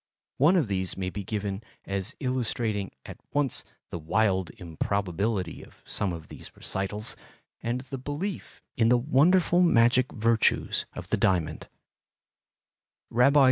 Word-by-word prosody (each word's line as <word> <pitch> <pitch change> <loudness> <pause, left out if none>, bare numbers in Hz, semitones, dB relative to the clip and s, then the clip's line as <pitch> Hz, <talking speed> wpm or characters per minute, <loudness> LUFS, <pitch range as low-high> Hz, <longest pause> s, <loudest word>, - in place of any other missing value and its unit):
One 155 +8 +5
of 165 -9 +3
these 95 -2 0
may 95 -1 -2
be 100 +1 -5
given 100 0 -3 0.2
as 100 +1 -2
illustrating 120 -6 -1 0.2
at - - -9
once 145 -3 +1 0.3
the 85 - -4
wild 95 +2 +1
improbability 95 +3 -2
of - - -18
some 100 - -1
of 80 -3 -7
these - - -10
recitals 100 +3 -3 0.5
and 120 +2 -1
the 135 0 -7
belief 145 +9 -5
in 115 -1 +3
the 125 - +6
wonderful 165 +7 +4
magic 125 -6 +4
virtues 115 0 +2
of - - -8
the - - +3
diamond: 90 -5 +1 1.5
R. 125 +3 +6
110 Hz, 135 wpm, -27 LUFS, 95-130 Hz, 1.5 s, the